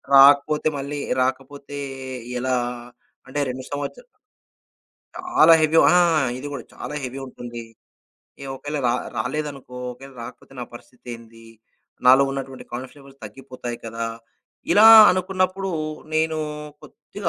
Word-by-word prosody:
రాకపోతే 140 +3 +6
మళ్ళీ, 140 +1 -5 0.2
రాకపోతే 140 +2 -4 0.6
ఎలా? 130 +1 0 0.7
అంటే 140 +2 -4
2 130 +1 -5
సంవత్స 145 - -4 1.2
చాలా 360 - +5
హెవీ 155 +1 +3 0.2
ఆ! - - +5 0.4
ఇది 145 - -6
కూడా. 130 - -6
చాలా - - -7
హెవీ 130 +1 -5
ఉంటుంది. 120 -2 -8 0.8
ఏ - - -6
ఒకవేళ 145 +2 -5
ర 120 - +3 0.3
రాలేదనుకో 140 -2 -4 0.2
ఒకవేళ 135 +2 -13
రాకపోతే 115 - -12
నా 120 - -4
పరిస్థితేంది? 115 -2 -12 0.6
నాలో 130 +2 +8
ఉన్నటువంటి 135 -1 -6
కాన్ఫిడెన్స్ 130 +4 -7
లెవల్స్ 135 -1 -17
తగ్గిపోతాయి 125 +1 -8
కదా! 115 0 -4 0.7
ఇలా 210 +5 +7 0.2
అనుకున్నప్పుడు 185 +1 -1 0.5
నేను 160 0 +1 0.4
కొద్దిగా 200 -4 -7
135 Hz, 115 wpm, -22 LUFS, 125-150 Hz, 1.2 s, నాలో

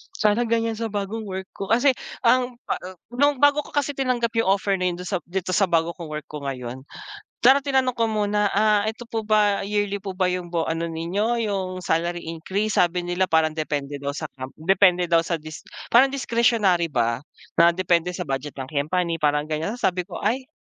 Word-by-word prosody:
Sana 215 +2 +2
ganyan 230 -1 0
sa 230 - -1
bagong 210 +2 -4
work 190 0 -5
ko 195 - -6
kasi 245 +6 +4 0.3
ang 250 +1 +3
pa - - -2
ah, 185 0 -8 0.2
nung 285 +2 +2
bago 290 +1 +6
ko - - -14
kasi 290 0 +1
tinanggap 250 -3 +1
yung 225 - +1
offer 195 0 0
na 185 - 0
yun 175 - -1
dun 180 - -7
sa 190 - 0
dito 185 +1 -3
sa 195 +2 +3
bago 165 0 +1
kong 170 - -7
work 150 -1 -6
ko 150 - -5
ngayon, 130 -1 -5 0.6
sana 265 +3 +8
tinanong 265 -2 +1
ko 230 -1 +1
muna, 210 -1 +1
ah, 210 0 +4
"Eto 230 +3 -7
po 225 -1 -3
ba 210 -2 +3
yearly 205 -1 -1
po 195 -2 -6
ba 185 - +2
yung 180 -1 -3
bo 170 -1 0
ano 165 +1 -2
ninyo 190 +9 -1
yung 195 -3 -1 0.2
salary 170 +1 0
increase?" 190 +6 -2
Sabi 175 0 +1
nila 180 +1 0
parang 160 -1 +3
depende 145 -2 -3
daw 140 - -3
sa 155 - -4
com 130 -1 -7
depende 180 +1 +3
daw 165 - +6
sa 170 +1 -2
dis 155 0 -9 0.3
parang 255 +3 +7
discretionary 230 -9 +2
ba, 115 -4 0 0.4
na 170 0 +8
depende 175 -1 +1
sa 180 - -3
budget 135 +1 -4
ng 135 - -4
company 165 +3 -1
parang 150 0 +2
ganyan. 160 +8 -2
Tapos 245 - -13
sabi 180 -1 +1
ko 185 - -7
ay, 255 +6 0
190 Hz, 210 wpm, -23 LUFS, 165-220 Hz, 0.6 s, sana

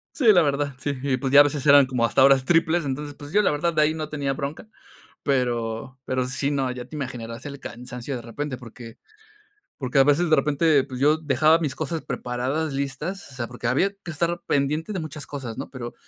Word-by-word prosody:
Sí, 240 -8 +5
la 175 - +6
verdad, 140 -1 0
sí, 145 +1 -2
y 135 -2 +1
pues 135 +1 -2
ya 145 +1 +9
a - - +8
veces 145 -1 -2
eran 140 -1 +8
como 125 -2 -1
hasta 130 +3 +3
horas 135 -1 +6
triples. 165 0 +2
Entonces, 145 +2 -4
pues 145 +1 -11
yo 210 - +4
la - - +2
verdad 165 +3 0
de 155 - +3
ahí 155 +1 +2
no 155 -1 -5
tenía 140 -2 -2
bronca. 140 +9 -5 0.6
Pero 125 -2 -1
pero 130 -1 -1
sí, 140 +3 -1
no, 135 -3 0
ya 125 -1 -6
te 155 - -11
imaginarás 120 -3 -6
el 140 -1 -7
cansancio 125 +2 -7
de 120 - -5
repente 130 +3 -5
porque 115 -1 -12 0.8
porque 130 -1 -1
a 135 - +7
veces 155 +4 +3
de 155 - +5
repente, 145 0 +3
pues 130 -1 -8
yo 150 +2 +4
dejaba 155 +1 +3
mis 150 -5 -2
cosas 155 +2 -3
preparadas, 135 +5 -3
listas, 140 +6 -4
o - - -11
sea, 120 -2 -3
porque 120 -1 -6
había 130 +11 +2 0.2
que 175 - -6
estar 170 +2 -1
pendiente 150 +8 0
de 185 - -3
muchas 150 -3 -7
cosas, 130 -6 -6
¿no? - - -6
Pero 120 -3 -7
140 Hz, 225 wpm, -24 LUFS, 130-155 Hz, 0.8 s, ya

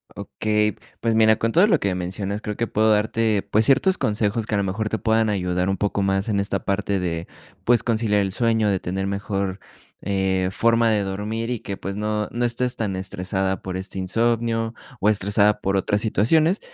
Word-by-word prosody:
Okey. 105 0 -1 0.2
Pues 115 -1 0
mira, 110 -1 +5
con 115 - 0
todo 180 +6 +5
lo 170 -7 +3
que 100 -2 0
mencionas, 95 +3 -4
creo 105 -1 -5
que 115 - -1
puedo 110 +1 +2
darte, 105 -1 +1
pues 110 +1 +3
ciertos 180 - +3
consejos 105 +1 0
que 105 - -2
a - - +2
lo 100 - +1
mejor 105 +3 -2
te 110 - -1
puedan 110 +1 +2
ayudar 90 -2 0
un 95 - 0
poco 100 0 -1
más 95 +1 0
en 105 -3 0
esta 100 - -3
parte 100 -1 0
de 85 -2 -3 0.4
pues 120 0 +3
conciliar 110 -3 +1
el 95 -1 -2
sueño, 110 -2 +2
de 95 -2 +1
tener 95 +2 -3
mejor, 100 -1 -3 0.4
eh, 95 -1 0
forma 115 +2 +3
de 105 -2 +2
dormir 105 +4 -3
y 120 - -2
que 100 -1 -5
pues 100 0 -5
no, 105 0 -1
no 120 +1 -2
estés 125 +1 -1
tan 105 -4 -2
estresada 95 0 -2
por 95 -1 -5
este 95 0 -5
insomnio 115 +3 0 0.3
o 100 - +1
estresada 105 0 +2
por 95 0 0
otra 100 +2 +1
situaciones, 155 - +2
105 Hz, 200 wpm, -23 LUFS, 95-115 Hz, 0.4 s, mira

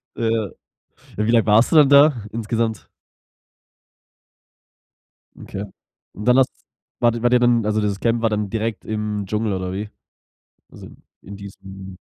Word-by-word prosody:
Ja. 115 -4 -1 0.7
Wie 105 +2 +1
lang 115 -2 +3
warst 110 +3 +4
du - - +2
dann 145 -3 +7
da 140 -5 +5
insgesamt? 115 -1 -2 2.6
Okay. 95 - -6 0.5
Und 105 - -8
dann 125 +1 +4
hast 130 - +2 0.5
wart 120 -1 +2
ihr 120 - -6
wart 120 - +3
ihr 125 - +5
dann 120 -2 +2
also, 105 0 0
dieses 100 -1 -2
Camp 115 0 0
war 115 - +2
dann 105 -2 -2
direkt 115 0 -3
im 105 -1 -3
Dschungel 105 +1 -2
oder 95 -1 -3
wie? 105 +3 -5 0.8
Also, - - -12 0.3
in 100 - -10
diesem 95 -1 -11
110 Hz, 150 wpm, -21 LUFS, 100-115 Hz, 2.6 s, dann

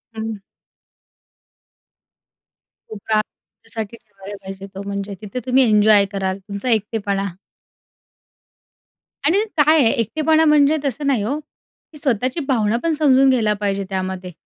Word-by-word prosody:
हं. 220 -1 -4 2.5
कोपरा 215 0 -1
तुमच्यासाठी 220 +1 -9
ठेवायला 205 -3 -11
पाहिजे 195 0 -8
तो. 195 - -5
म्हणजे 200 0 -5
तिथे 210 +4 -5
तुम्ही 260 +1 +4
एन्जॉय 210 -1 +5
कराल 190 -1 -2
तुमचा 200 +4 -5
एकटेपणा. 205 -3 0 2.0
आणि 370 +8 +3
काय 305 +1 +5
आहे 240 -6 +5
एकटेपणा 310 +8 +2
म्हणजे 300 0 +4
तसं 280 +2 -2
नाही 255 -7 +1
हो, 260 +8 -1
की 305 0 -21
स्वतःची 255 +1 -1
भावना 225 -4 +1
पण 335 - +1
समजून 275 -3 +4
घ्यायला 225 -5 +2
पाहिजे 200 -1 -1
त्यामध्ये. 185 -1 -4
220 Hz, 120 wpm, -20 LUFS, 200-270 Hz, 2.5 s, एन्जॉय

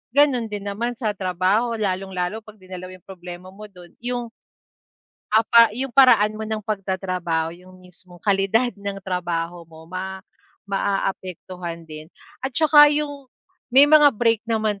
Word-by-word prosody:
Ganun 265 -6 +3
din 205 -1 -5
naman 235 +4 -3
sa 220 -5 -1
trabaho, 190 +5 0
lalong-lalo 190 0 -2
pagdinala 185 -4 -11
mo 185 - -10
yung 185 - -21
problema 180 0 -10
mo 210 +2 -11
dun, 180 -3 -15
yung, 240 -1 -4 1.0
ah, 220 - +6
pa 230 -1 +5
yung 265 +1 -3
paraan 215 -5 +5
mo 220 - -5
ng 215 -1 -3
pagtatrabaho, 185 -5 -2
yung 185 0 -17
mismong 180 -1 -15
kalidad 205 +4 +2
ng 200 -1 -6
trabaho 175 -2 -3
mo, 160 0 -15
ma 190 +1 -6 0.5
maaapektuhan 185 -3 -3
din. 155 -1 -10 0.4
At 265 -2 -3
tsaka 300 -2 +7
yung 290 -2 -3 0.4
may 265 +3 +7
mga 295 0 +7
break 230 -1 +2
naman 215 -3 0
195 Hz, 145 wpm, -22 LUFS, 185-230 Hz, 1.0 s, tsaka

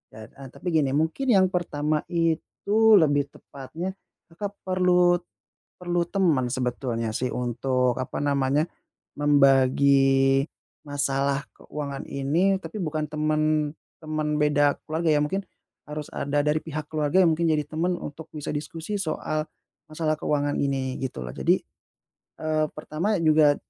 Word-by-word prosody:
Heeh, 115 +5 -11
tapi - - -10
gini, 150 -5 +2
mungkin 160 - 0
yang 190 -3 +5
pertama 155 -4 -1
itu 200 +6 +2
lebih 145 -4 +3
tepatnya 160 +9 -7 0.4
Kakak, 200 +4 -5
perlu 180 -1 +4 0.6
perlu 175 -1 0
teman 165 -10 +2
sebetulnya 120 -3 -2
sih 125 - 0
untuk, 125 0 0
apa 130 - -4
namanya 140 +1 +2 0.6
membagi 135 -1 +4 0.4
masalah 140 0 0
keuangan 140 -2 -6
ini, 165 +8 +1
tapi 215 - -7
bukan 155 -2 -2
temen 155 0 +1 0.3
temen 155 -1 -2
beda 145 -1 +3
keluarga 160 +1 0
ya, 145 - +3
mungkin 195 +6 -2 0.5
harus 150 0 -6
ada 145 +1 0
dari 150 +1 +2
pihak 155 -1 -6
keluarga 155 +4 +2
yang 170 - +5
mungkin 170 - 0
jadi 155 -1 +2
temen 170 +3 0
untuk 150 +2 -8
bisa 150 - -4
diskusi 165 +6 -4
soal, 155 -3 -2 0.4
masalah 155 0 0
keuangan 145 -1 0
ini, 135 -2 -1
gitu 130 - -4
loh. - - -5
Jadi, - - +2 0.8
eee, 155 -1 +1
pertama 170 +7 -2
juga, 155 -2 +5
150 Hz, 130 wpm, -25 LUFS, 140-165 Hz, 0.8 s, yang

